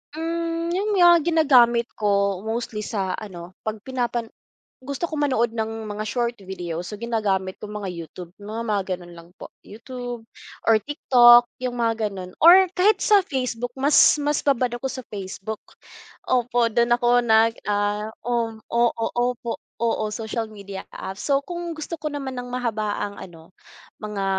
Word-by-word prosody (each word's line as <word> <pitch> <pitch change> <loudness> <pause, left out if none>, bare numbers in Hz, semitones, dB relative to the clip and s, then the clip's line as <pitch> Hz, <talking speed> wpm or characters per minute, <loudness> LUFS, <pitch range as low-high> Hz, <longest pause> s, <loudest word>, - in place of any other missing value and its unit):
Hmm, 335 +1 -2
yun 400 +4 -1
nga, 350 -2 +7
ginagamit 265 -8 +4
ko, 200 -2 +1
mostly 225 -1 -3
sa 195 -3 -2
ano, 180 -4 -9
pag 215 0 -3
pinapan 240 -3 -2 0.5
gusto 280 +5 -4
ko 310 - -4
manood 240 -5 +1
ng 220 -1 -3
mga 210 +1 -4
short 235 +1 -1
video, 180 -3 -6
so 180 - -7
ginagamit 200 -5 -1
ko - - -8
mga 210 -2 -5
YouTube, 170 0 -8
mga 215 +3 -6
mga 210 -4 0
gano'n 175 -1 -9
lang 170 0 -13
po - - -10 0.2
YouTube 245 +1 -7 0.5
or 225 - +7
TikTok, 240 -2 +6
yung 245 -2 -3
mga 225 -1 +1
ganun 185 -2 -8
or 365 +3 +8
kahit 415 +4 +4
sa 410 -4 +4
Facebook 245 -3 -3
mas 285 +2 +5
mas 295 0 0
babad 260 -3 +2
ako 255 - -8
sa 260 0 -3
Facebook, 200 +1 -6 0.7
opo, 245 -1 +2
dun 235 +1 +2
ako 240 0 +3
nag 225 0 +4
ah 205 +1 -1
oo 235 -2 -1 0.2
oo, 235 -1 +1
opo, 245 -1 -1 0.2
oo 225 -2 +1
social 225 +1 -3
media 200 -3 -9
apps, 190 +1 -7
so 280 -1 +2
kung 345 +2 -5
gusto 315 +1 -6
ko 305 -1 -4
naman 270 -3 -5
ng 245 - -4
mahabaang 215 -4 -2
ano, 165 -1 -12 0.5
mga 210 -2 -4
235 Hz, 155 wpm, -23 LUFS, 210-260 Hz, 0.7 s, or